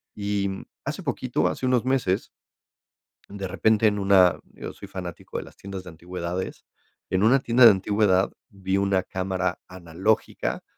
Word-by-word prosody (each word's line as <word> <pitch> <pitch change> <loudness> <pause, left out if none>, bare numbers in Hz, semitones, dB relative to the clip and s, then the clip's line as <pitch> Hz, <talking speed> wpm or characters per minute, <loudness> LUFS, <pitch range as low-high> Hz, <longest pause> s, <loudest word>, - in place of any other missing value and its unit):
y 100 -1 -1
mm, 95 - -7 0.2
hace - - -4
poquito, - - 0
hace - - -3
unos 125 -2 +2
meses 125 -7 +1 1.0
de 100 -1 -5
repente 105 +4 +3
en 105 -1 +1
una 95 -3 +5
yo - - -7
soy 100 - -11
fanático 90 -3 -7
de - - -4
las - - -15
tiendas 95 -1 -7
de 90 - -10
antigüedades 90 +2 -5 0.5
en 95 - +2
una 120 +6 +5
tienda 120 0 +5
de - - +12
antigüedad, 100 -1 +2 0.2
vi 95 -1 -2
una 100 -1 +1
cámara 95 -1 -2
analógica, 90 +4 -2
95 Hz, 155 wpm, -25 LUFS, 90-105 Hz, 1.0 s, de